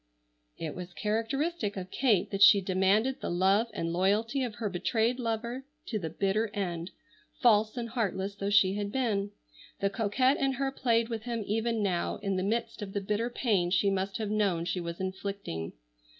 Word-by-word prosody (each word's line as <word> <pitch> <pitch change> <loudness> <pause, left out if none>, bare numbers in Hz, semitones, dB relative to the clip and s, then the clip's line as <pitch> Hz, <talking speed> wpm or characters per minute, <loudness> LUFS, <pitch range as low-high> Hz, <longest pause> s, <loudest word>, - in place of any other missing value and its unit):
It 155 -2 -4
was 180 -1 -8
characteristic 225 - -1
of 185 0 -6
Kate 220 -9 +2
that 195 - -3
she 200 0 +9
demanded 195 +7 +1
the - - -3
love 195 +6 +3
and 165 -5 -3
loyalty 210 +9 +1
of 240 -4 -3
her 230 -2 -2
betrayed 225 +6 0
lover 235 +2 -2 0.3
to 215 - -1
the 165 -4 -4
bitter 200 +6 0
end, 175 -3 -3 0.5
false 215 -1 +4
and 235 -1 -2
heartless 205 -4 -2
though 200 0 -3
she 200 -2 +5
had 205 0 -3
been. 210 -6 0 0.5
The 200 0 +1
coquette 225 +6 +2
in 270 -1 +1
her 270 +1 -1
played 235 -3 +1
with 225 -1 -4
him 235 -3 -2
even 225 +1 0
now 180 -3 0
in 195 -1 -2
the 185 - 0
midst 230 +3 -2
of 195 -2 -6
the 205 - 0
bitter 210 +4 -1
pain 210 -8 +1
she 195 +2 +3
must 195 0 -1
have 215 -2 -3
known 195 -6 +1
she 180 +1 -1
was 170 0 -5
inflicting. 190 - -4
205 Hz, 185 wpm, -30 LUFS, 190-230 Hz, 0.5 s, she